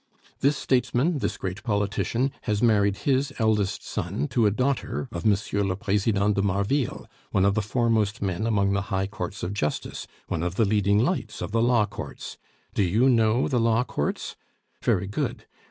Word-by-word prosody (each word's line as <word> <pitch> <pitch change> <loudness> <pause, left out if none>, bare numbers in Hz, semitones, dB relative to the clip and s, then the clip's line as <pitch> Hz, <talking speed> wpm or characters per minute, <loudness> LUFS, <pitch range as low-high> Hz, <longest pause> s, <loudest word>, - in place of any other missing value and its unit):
This 140 +1 +2
statesman, 135 +5 +1
this - - -2
great 95 0 -4
politician, 110 +4 0
has 105 -1 0
married 100 -3 +3
his 135 0 +2
eldest 105 -3 +1
son 70 - -3
to 115 -4 +3
a - - +5
daughter 130 +4 -1
of 85 +4 -2
M. 100 -2 +5 0.3
le 90 - 0
President 105 0 +1
de 100 - +1
Marville, 100 +7 0 0.2
one 95 -1 +2
of 100 - +4
the 110 - +1
foremost 110 -1 +1
men 95 +2 -1
among 100 -3 +2
the 100 - +1
high 95 -1 0
courts 100 0 -6
of 90 - -2
justice; 75 -7 -3 0.2
one 80 - -2
of 90 +1 -2
the 115 - +3
leading 100 0 +2
lights 140 - 0
of - - -4
the 115 +1 +2
law 120 -2 +4
courts. 100 - -8 0.3
Do - - +1
you 105 +8 +3
know 115 0 +3
the 130 -4 +1
law 115 +1 +3
courts? 75 - -3 0.5
Very 90 - +1
good. 100 +1 -3
105 Hz, 180 wpm, -25 LUFS, 100-120 Hz, 0.5 s, a